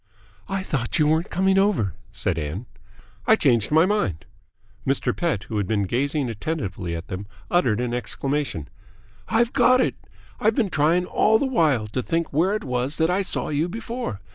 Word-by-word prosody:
"I 195 Hz, -1 st, -1 dB
thought 135 Hz, -10 st, -2 dB
you 150 Hz, -, +4 dB
weren't 160 Hz, +3 st, +1 dB
coming 190 Hz, +1 st, +2 dB
over!" 190 Hz, -, +2 dB, 0.2 s
said 95 Hz, -5 st, -1 dB
Ann. 80 Hz, +10 st, -4 dB, 0.6 s
"I 220 Hz, -, +7 dB
changed 120 Hz, -, +2 dB
my 160 Hz, +3 st, +6 dB
mind." 95 Hz, -, -1 dB, 0.6 s
Mr. 135 Hz, -2 st, 0 dB
Pett, 160 Hz, -, -1 dB
who 110 Hz, -, -5 dB
had 100 Hz, -3 st, 0 dB
been 105 Hz, -1 st, +1 dB
gazing 135 Hz, -, 0 dB
attentively 100 Hz, -, -3 dB
at 85 Hz, +1 st, -7 dB
them, 95 Hz, +2 st, -6 dB, 0.2 s
uttered 125 Hz, -11 st, +2 dB
an 120 Hz, -1 st, -1 dB
exclamation. 135 Hz, -, -2 dB, 0.6 s
"I've 235 Hz, 0 st, +2 dB
got 255 Hz, -1 st, +5 dB
it! -, -, +2 dB, 0.5 s
I've 220 Hz, +1 st, +2 dB
been 215 Hz, -7 st, +1 dB
trying 165 Hz, +4 st, +2 dB
all 220 Hz, +4 st, +3 dB
this 265 Hz, +2 st, -1 dB
while 150 Hz, -, +2 dB
to 130 Hz, -, -2 dB
think 165 Hz, +4 st, -2 dB
where 180 Hz, +8 st, +2 dB
it 215 Hz, -, -3 dB
was 125 Hz, +2 st, -2 dB
that 160 Hz, +1 st, +2 dB
I 190 Hz, +2 st, +2 dB
saw 195 Hz, -, -2 dB
you 150 Hz, +4 st, 0 dB
before. 230 Hz, -, -5 dB
150 Hz, 180 wpm, -24 LUFS, -, 0.6 s, I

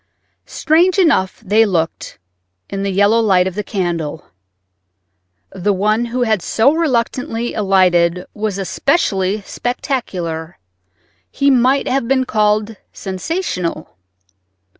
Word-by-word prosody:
Strange 350 Hz, +4 st, +2 dB
enough 310 Hz, -, +2 dB
they 215 Hz, +1 st, +3 dB
looked 170 Hz, -6 st, -2 dB, 0.5 s
in 195 Hz, -, -3 dB
the 200 Hz, -, -1 dB
yellow 205 Hz, +4 st, +3 dB
light 190 Hz, -5 st, +3 dB
of 190 Hz, -, -3 dB
the 210 Hz, +3 st, -3 dB
candle. 170 Hz, -7 st, -3 dB, 1.3 s
The 200 Hz, +3 st, -1 dB
one 215 Hz, +5 st, +1 dB
who 245 Hz, +1 st, -1 dB
had 220 Hz, -5 st, +1 dB
so 230 Hz, -, +2 dB
reluctantly 240 Hz, -6 st, -1 dB
alighted 180 Hz, -3 st, +2 dB
was 210 Hz, -2 st, -3 dB
especially 195 Hz, -, 0 dB
spectacular—he 160 Hz, -, -4 dB
might 260 Hz, +2 st, +2 dB
have 260 Hz, -2 st, 0 dB
been 260 Hz, 0 st, +1 dB
called 215 Hz, -1 st, 0 dB
sensational. 185 Hz, -, -4 dB
205 Hz, 105 wpm, -17 LUFS, 180-245 Hz, 1.3 s, they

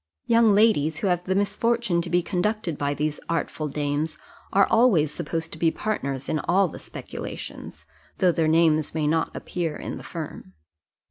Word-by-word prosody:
Young 230 Hz, -3 st, +5 dB
ladies 180 Hz, -8 st, +3 dB
who 195 Hz, -, -1 dB
have 175 Hz, 0 st, 0 dB
the 190 Hz, -, 0 dB
misfortune 205 Hz, -1 st, +1 dB
to 170 Hz, -, -6 dB
be 175 Hz, 0 st, +2 dB
conducted 185 Hz, -1 st, -1 dB
by 145 Hz, 0 st, -1 dB
these 150 Hz, 0 st, -2 dB
artful 165 Hz, -2 st, -2 dB
dames, 145 Hz, +2 st, -2 dB, 0.3 s
are 200 Hz, 0 st, +5 dB
always 200 Hz, -, +4 dB
supposed 165 Hz, -1 st, -3 dB
to 160 Hz, -, -9 dB
be 165 Hz, -, +4 dB
partners 140 Hz, -10 st, -3 dB
in 155 Hz, -, 0 dB
all 190 Hz, +4 st, +2 dB
the -, -, -9 dB
speculations, -, -, -8 dB, 0.3 s
though 185 Hz, -2 st, +4 dB
their 165 Hz, -1 st, +1 dB
names 155 Hz, -1 st, +3 dB
may 155 Hz, -2 st, 0 dB
not 160 Hz, +2 st, +1 dB
appear 165 Hz, -4 st, -3 dB
in -, -, -6 dB
the -, -, -11 dB
firm. 155 Hz, -, -7 dB
165 Hz, 175 wpm, -25 LUFS, 155-200 Hz, 0.3 s, Young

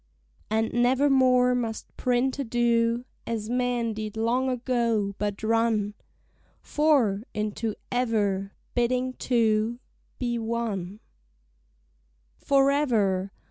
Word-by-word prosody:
And 220 Hz, +1 st, 0 dB
nevermore 255 Hz, 0 st, +4 dB
must 230 Hz, -3 st, -4 dB
printer 255 Hz, +3 st, 0 dB
do 235 Hz, 0 st, +1 dB, 0.2 s
As 225 Hz, -1 st, -3 dB
men 245 Hz, -2 st, 0 dB
did 215 Hz, 0 st, -6 dB
long 245 Hz, +4 st, +1 dB
ago; 235 Hz, -5 st, 0 dB
but 205 Hz, 0 st, -3 dB
run 225 Hz, -2 st, +1 dB, 0.7 s
"For" 275 Hz, -10 st, +2 dB
into 215 Hz, +1 st, -2 dB, 0.2 s
"ever," 205 Hz, -5 st, 0 dB, 0.2 s
bidding 250 Hz, +1 st, 0 dB
two 230 Hz, -2 st, +1 dB, 0.4 s
Be 240 Hz, -2 st, -2 dB
one. 220 Hz, -4 st, -3 dB, 1.4 s
Forever! 245 Hz, -9 st, +2 dB
235 Hz, 90 wpm, -26 LUFS, 215-250 Hz, 1.4 s, nevermore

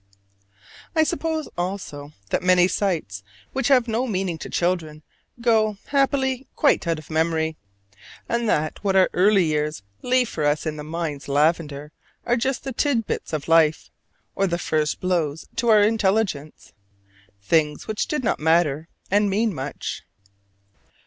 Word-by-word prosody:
I 315 Hz, -, +5 dB
suppose, 320 Hz, -1 st, -2 dB
also, 175 Hz, -6 st, -4 dB, 0.2 s
that -, -, +1 dB
many 180 Hz, -1 st, +5 dB
sights 165 Hz, -, -2 dB, 0.3 s
which 265 Hz, -2 st, 0 dB
have 255 Hz, -4 st, +4 dB
no 235 Hz, +3 st, -1 dB
meaning 185 Hz, -6 st, -2 dB
to -, -, -7 dB
children 165 Hz, -4 st, -1 dB, 0.4 s
go, 220 Hz, -3 st, +2 dB
happily, 270 Hz, -2 st, +1 dB
quite 285 Hz, -, +2 dB
out 165 Hz, -1 st, +1 dB
of 155 Hz, -1 st, -11 dB
memory; 160 Hz, 0 st, 0 dB, 0.7 s
and 235 Hz, -1 st, 0 dB
that 155 Hz, +2 st, -1 dB
what 195 Hz, -1 st, +1 dB
our 190 Hz, -1 st, +4 dB
early 195 Hz, +1 st, +4 dB
years 150 Hz, -3 st, -1 dB, 0.2 s
leave 250 Hz, 0 st, +2 dB
for 155 Hz, -, -4 dB
us 145 Hz, +2 st, +1 dB
in 155 Hz, -1 st, -2 dB
the 150 Hz, -, -6 dB
mind's 155 Hz, -2 st, -4 dB
lavender 150 Hz, 0 st, 0 dB, 0.3 s
are 240 Hz, -, +2 dB
just 260 Hz, +2 st, -1 dB
the 270 Hz, -, -4 dB
tit 240 Hz, -3 st, +1 dB
bits -, -, -4 dB
of 155 Hz, -3 st, -3 dB
life, 165 Hz, -1 st, +3 dB, 0.4 s
or 195 Hz, -, +1 dB
the 170 Hz, -1 st, -1 dB
first 155 Hz, -3 st, -1 dB
blows 165 Hz, -4 st, -1 dB
to 235 Hz, 0 st, +1 dB
our 215 Hz, -2 st, +6 dB
intelligence 200 Hz, -8 st, 0 dB, 0.7 s
things 150 Hz, +9 st, +1 dB
which 215 Hz, -1 st, -2 dB
did 300 Hz, -3 st, -2 dB, 0.2 s
matter 160 Hz, -1 st, +2 dB, 0.2 s
and 205 Hz, +1 st, +3 dB
mean 215 Hz, +2 st, +1 dB
much. 140 Hz, -1 st, -5 dB
180 Hz, 150 wpm, -23 LUFS, 155-225 Hz, 0.7 s, our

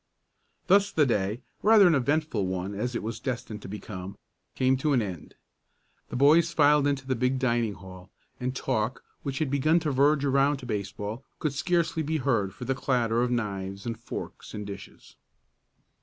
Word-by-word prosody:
Thus 200 Hz, +2 st, +4 dB
the 150 Hz, -, +3 dB
day 105 Hz, -1 st, 0 dB, 0.2 s
rather 215 Hz, -1 st, +7 dB
an 175 Hz, -, +6 dB
eventful 140 Hz, -6 st, +1 dB
one 95 Hz, +2 st, -3 dB
as 120 Hz, +5 st, -3 dB
it -, -, -2 dB
was 110 Hz, +1 st, -4 dB
destined 115 Hz, -4 st, -4 dB
to -, -, -9 dB
become 95 Hz, -1 st, -7 dB, 0.4 s
came 130 Hz, 0 st, +3 dB
to 150 Hz, +2 st, +1 dB
an 125 Hz, -, +3 dB
end. 90 Hz, -6 st, -7 dB, 0.7 s
The -, -, -6 dB
boys 155 Hz, +6 st, +5 dB
filed 150 Hz, -2 st, +4 dB
into 140 Hz, -2 st, -1 dB
the 130 Hz, -1 st, 0 dB
big 125 Hz, +2 st, +1 dB
dining 120 Hz, -5 st, 0 dB
hall, 95 Hz, -1 st, -12 dB, 0.3 s
and 125 Hz, +1 st, -2 dB
talk, 110 Hz, -1 st, -1 dB, 0.2 s
which 135 Hz, -1 st, -4 dB
had 150 Hz, -3 st, -1 dB
begun 155 Hz, +4 st, +3 dB
to 150 Hz, -, -1 dB
verge 140 Hz, +2 st, +3 dB
around 140 Hz, +1 st, +3 dB
to 130 Hz, -, -10 dB
baseball, 105 Hz, +2 st, -4 dB
could 150 Hz, -3 st, -2 dB
scarcely 165 Hz, +2 st, 0 dB
be 160 Hz, +1 st, -1 dB
heard 115 Hz, -9 st, 0 dB
for 100 Hz, +6 st, -8 dB
the 135 Hz, -, +1 dB
clatter 120 Hz, -3 st, +1 dB
of 125 Hz, -, +1 dB
knives 100 Hz, -5 st, -3 dB
and 115 Hz, -1 st, -2 dB
forks -, -, -8 dB
and 105 Hz, -1 st, -5 dB
dishes. 100 Hz, 0 st, -10 dB
125 Hz, 180 wpm, -27 LUFS, 105-145 Hz, 0.7 s, rather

